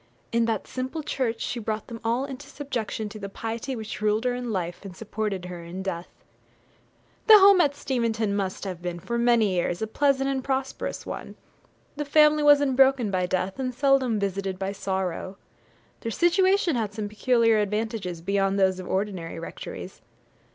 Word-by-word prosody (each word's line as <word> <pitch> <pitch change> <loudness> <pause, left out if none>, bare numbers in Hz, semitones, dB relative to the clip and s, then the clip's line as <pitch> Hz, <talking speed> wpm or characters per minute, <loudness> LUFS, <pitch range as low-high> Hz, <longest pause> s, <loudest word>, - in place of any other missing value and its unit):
In 230 0 +2
that 225 -3 -1
simple 260 +5 -4
church 250 -6 -2
she 245 - -2
brought 215 -1 -3
them 230 -2 -9
all 235 +4 0
into 275 0 -8
subjection 250 -7 -4
to 215 +1 -9
the 200 -1 -6
piety 230 +6 -4
which 220 -2 -6
ruled 215 +1 +2
her 250 -1 +1
in 245 -1 -4
life, 175 -3 -3
and 190 -2 -9
supported 210 -4 -3
her 175 -1 -7
in 180 +3 -6
death. 175 -2 -4 1.2
The 435 -1 +11
home 395 -2 +7
at 285 -3 +2
Steventon 230 -6 -1
must 195 -2 -2
have 185 -3 -5
been, 175 -1 -4
for 235 +7 -3
many 235 -4 +4
years, 175 0 0
a 220 - -1
pleasant 270 +4 +1
and 270 -1 -1
prosperous 265 0 -3
one. - - -7 0.6
The 295 - -1
family 300 +1 +5
was 290 -1 +6
unbroken 265 -4 +3
by 185 -1 0
death, 185 +4 -2
and 255 -2 -2
seldom 270 -4 +3
visited 195 -1 -2
by 190 +1 -2
sorrow. 190 -1 -3 0.6
Their 230 - -4
situation 370 - +3
had 215 -3 -2
some 215 -1 -3
peculiar 230 +1 +3
advantages 210 -4 -2
beyond 195 +2 +1
those 190 -1 +3
of 185 - -7
ordinary 190 -4 -2
rectories. 165 - -8
220 Hz, 175 wpm, -26 LUFS, 195-265 Hz, 1.2 s, The